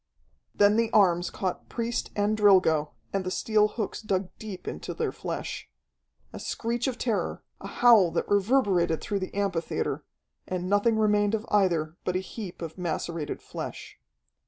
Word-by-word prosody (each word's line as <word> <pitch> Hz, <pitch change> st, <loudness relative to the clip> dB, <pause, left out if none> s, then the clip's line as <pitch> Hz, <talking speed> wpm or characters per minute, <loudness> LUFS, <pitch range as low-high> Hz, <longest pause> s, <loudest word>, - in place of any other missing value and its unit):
Then 205 Hz, +1 st, +5 dB
the 230 Hz, -1 st, +2 dB
arms 180 Hz, -4 st, +4 dB
caught 185 Hz, -2 st, -4 dB
priest 235 Hz, 0 st, -2 dB
and 205 Hz, +1 st, +1 dB
Drilgo, 185 Hz, -8 st, +4 dB, 0.2 s
and 195 Hz, -1 st, 0 dB
the 185 Hz, -, -2 dB
steel 210 Hz, +2 st, +2 dB
hooks 210 Hz, -1 st, -4 dB
dug 190 Hz, -3 st, -1 dB
deep 200 Hz, -5 st, -8 dB
into 75 Hz, -, -5 dB
their -, -, -1 dB
flesh. -, -, -5 dB, 0.6 s
A -, -, -7 dB
screech 235 Hz, +2 st, -2 dB
of 255 Hz, -2 st, -2 dB
terror, 230 Hz, -5 st, -1 dB, 0.2 s
a -, -, -7 dB
howl 230 Hz, -7 st, +5 dB
that -, -, -1 dB
reverberated 200 Hz, -6 st, +2 dB
through 200 Hz, -2 st, -2 dB
the 185 Hz, -, -6 dB
amphitheatre, 190 Hz, -5 st, -1 dB, 0.4 s
and 180 Hz, -1 st, -3 dB
nothing 205 Hz, +3 st, +3 dB
remained 210 Hz, 0 st, +3 dB
of 220 Hz, +1 st, -4 dB
either 170 Hz, -5 st, +2 dB
but 180 Hz, -, -1 dB
a -, -, +2 dB
heap 190 Hz, -2 st, -7 dB
of 165 Hz, +2 st, -7 dB
macerated 170 Hz, -2 st, -3 dB
flesh. -, -, -7 dB
200 Hz, 160 wpm, -27 LUFS, 180-215 Hz, 0.6 s, Then